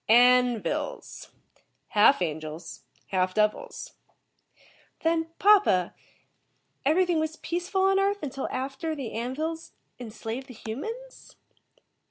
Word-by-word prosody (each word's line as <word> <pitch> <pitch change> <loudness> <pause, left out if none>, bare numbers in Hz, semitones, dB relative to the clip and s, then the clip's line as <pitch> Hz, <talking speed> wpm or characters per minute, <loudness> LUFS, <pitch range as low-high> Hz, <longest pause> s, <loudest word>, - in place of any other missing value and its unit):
"'An 245 0 +6
vils'. - - -4 0.6
Half 210 0 +5
angels, 155 0 -5 0.3
half 185 -1 0
devils." 215 0 -1 1.1
"Then, 325 0 +1
papa, 385 - +4 0.9
everything 340 +3 +3
was 315 0 -2
peaceful 355 +4 -2
on 390 0 +4
Earth 400 -1 0 0.3
after 270 +5 -3
the 265 -6 -5
An 240 +3 -3
vils 320 +2 -4 0.3
enslaved 225 +2 -6
the 250 - -11
humans?" 450 - -7
270 Hz, 100 wpm, -27 LUFS, 220-345 Hz, 1.1 s, An